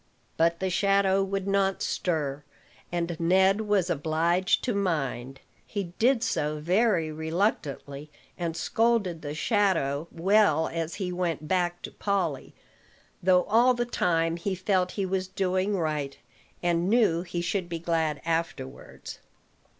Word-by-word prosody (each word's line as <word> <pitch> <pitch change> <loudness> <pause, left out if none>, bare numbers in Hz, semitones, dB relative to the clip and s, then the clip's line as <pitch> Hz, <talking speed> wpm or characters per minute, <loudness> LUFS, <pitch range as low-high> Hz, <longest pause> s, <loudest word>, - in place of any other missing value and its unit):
But 170 +1 +2
the 190 -1 -1
shadow 195 +1 +3
would 195 0 -3
not 195 -1 +1
stir, 145 -5 -2 0.5
and 170 0 -2
Ned 190 +4 +3
was 200 -4 +2
obliged 165 +3 +1
to 245 - 0
mind. 135 -9 -2 0.2
He 195 -5 -5
did 245 0 +3
so 150 -8 -1
very 180 -1 +2
reluctantly, 155 -3 -2 0.3
and 170 -2 -3
scolded 220 -8 +1
the 145 0 -5
shadow 165 - +1
well 170 -3 +3
as 165 0 -4
he 185 -3 -3
went 170 -4 -2
back 175 0 0
to - - -6
Polly; 185 -9 -2 0.7
though 180 0 +4
all 240 +6 +4
the 240 0 -1
time 165 -7 0
he 190 +3 -2
felt 185 -1 0
he 200 - -1
was 190 0 -1
doing 190 +1 0
right, 150 -4 -2 0.5
and 175 +1 +1
knew 210 -8 +3
he 175 -1 -4
should 180 0 -2
be 170 - -3
glad 160 -3 -1
afterwards. 165 -5 -4
175 Hz, 135 wpm, -27 LUFS, 160-195 Hz, 0.7 s, though